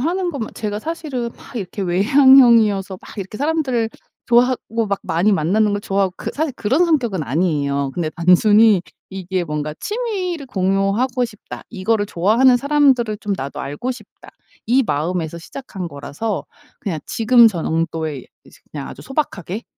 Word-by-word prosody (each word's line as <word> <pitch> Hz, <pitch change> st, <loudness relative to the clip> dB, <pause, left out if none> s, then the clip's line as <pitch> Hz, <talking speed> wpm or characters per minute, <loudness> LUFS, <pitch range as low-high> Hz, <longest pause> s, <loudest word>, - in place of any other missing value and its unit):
하는 350 Hz, +6 st, -1 dB
건 285 Hz, -5 st, -6 dB
막 220 Hz, -, -7 dB
제가 210 Hz, -2 st, -3 dB
사실은 275 Hz, -4 st, -4 dB
막 -, -, -13 dB
이렇게 200 Hz, -1 st, -4 dB
외향형이어서 215 Hz, -1 st, +5 dB
막 -, -, -13 dB
이렇게 195 Hz, +2 st, -6 dB
사람들 280 Hz, -6 st, 0 dB, 0.4 s
좋아하고 235 Hz, -2 st, +2 dB
막 200 Hz, -1 st, -2 dB
많이 180 Hz, +6 st, +1 dB
만나는 205 Hz, +5 st, +2 dB
걸 205 Hz, -, -1 dB
좋아하고 195 Hz, -2 st, -1 dB
그 -, -, -5 dB
사실 310 Hz, -1 st, -2 dB
그런 265 Hz, +11 st, +2 dB
성격은 245 Hz, -, 0 dB
아니에요. 140 Hz, -2 st, 0 dB
근데 170 Hz, 0 st, -2 dB
단순히 205 Hz, +4 st, +5 dB, 0.3 s
이게 190 Hz, -1 st, -3 dB
뭔가 150 Hz, -1 st, -4 dB
'취미를 390 Hz, -, -3 dB
공유하고 195 Hz, +5 st, 0 dB
싶다. 215 Hz, -3 st, -9 dB
이거를 210 Hz, 0 st, 0 dB
좋아하는 225 Hz, +8 st, +4 dB
사람들을 265 Hz, -5 st, +2 dB
좀 205 Hz, -2 st, -2 dB
나도 135 Hz, +1 st, -6 dB
알고 145 Hz, -, -4 dB
싶다.' 240 Hz, -5 st, -11 dB, 0.4 s
이 255 Hz, +4 st, +4 dB
마음에서 165 Hz, +2 st, -2 dB
시작한 190 Hz, -1 st, -7 dB
거라서 165 Hz, +8 st, -4 dB, 0.3 s
그냥 170 Hz, -6 st, -3 dB
지금 230 Hz, 0 st, +5 dB
정도의 160 Hz, -, -3 dB, 0.2 s
이제 -, -, -19 dB
그냥 145 Hz, -2 st, -6 dB
아주 -, -, -10 dB
소박하게 230 Hz, -, -3 dB
210 Hz, 355 characters per minute, -19 LUFS, 180-255 Hz, 0.4 s, 외향형이어서